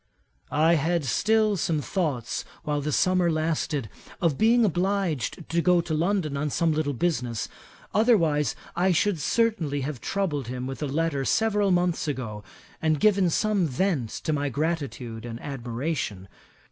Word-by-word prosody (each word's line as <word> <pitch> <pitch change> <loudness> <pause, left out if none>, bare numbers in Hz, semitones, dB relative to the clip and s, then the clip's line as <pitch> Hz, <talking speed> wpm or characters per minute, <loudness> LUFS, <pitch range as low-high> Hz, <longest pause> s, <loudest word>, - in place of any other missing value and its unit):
'"I 160 +3 +3
had 170 -1 0
still 215 - +2
some 160 -2 0
thoughts, 145 - -2 0.2
while 145 -1 -1
the 150 +2 -2
summer 185 +3 +3
lasted, 155 -5 -1 0.3
of 165 -6 +2
being 230 - +4
obliged 180 - -1
to 170 +1 +1
go 180 0 +4
to 170 -1 -2
London 165 -2 0
on 150 +2 -1
some 165 +3 +1
little 150 -2 0
business; 125 -8 -1 0.5
otherwise 170 -10 +3 0.2
I 180 +1 +3
should 185 +1 +1
certainly 165 -6 +1
have 135 -2 -4
troubled 160 - -1
him 125 +1 -4
with 135 +2 -6
a 150 - -1
letter 145 -1 0
several 210 +4 +2
months 175 -3 +1
ago, 115 -7 -4 0.4
and 155 -2 +2
given 195 -2 +4
some 200 0 +1
vent 145 - 0
to 155 - 0
my 145 -1 0
gratitude 135 -6 -3
and 115 -1 -6
admiration. 125 - -4
160 Hz, 150 wpm, -26 LUFS, 140-185 Hz, 0.5 s, being